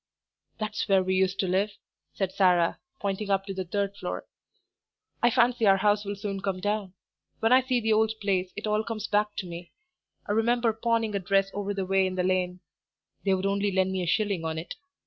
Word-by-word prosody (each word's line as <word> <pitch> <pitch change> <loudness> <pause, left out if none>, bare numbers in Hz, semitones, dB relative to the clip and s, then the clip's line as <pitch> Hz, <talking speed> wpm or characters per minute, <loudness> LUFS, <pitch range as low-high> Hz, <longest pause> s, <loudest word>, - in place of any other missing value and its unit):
"That's 215 -1 -3
where 190 -1 +5
we 185 0 0
used 190 0 +2
to 190 - -1
live," 195 +3 +1 0.4
said 190 -2 -1
Sarah, 180 -3 +3 0.2
pointing 200 +1 -2
up 195 0 +1
to 195 - -5
the 190 0 -3
third 200 +2 -2
floor. - - -5 1.0
"I 240 - +5
fancy 240 -2 +3
our 195 0 +6
house 205 +1 +2
will 205 0 -3
soon 195 -1 -4
come 195 -2 -2
down. 205 -1 -2 0.4
When 225 +2 +3
I 260 - +7
see 255 -1 0
the 220 -1 +1
old 220 0 +3
place 190 -3 0
it 205 - -5
all 215 0 +1
comes 220 -2 -4
back 210 -1 +1
to 190 - -4
me. 175 0 -8 0.5
I - - -3
remember 230 +1 +2
pawning 225 -1 0
a 200 - 0
dress 195 +1 +1
over 205 0 -3
the 195 -1 -2
way 190 0 +2
in 185 - -4
the 180 - 0
lane; 180 -1 0 0.6
they 195 -1 +3
would 190 +1 -3
only 200 +1 +1
lend 190 0 +1
me 190 -1 -1
a 175 - -3
shilling 200 -2 +1
on 160 0 -2
it. 160 - -5
200 Hz, 215 wpm, -27 LUFS, 185-215 Hz, 1.0 s, I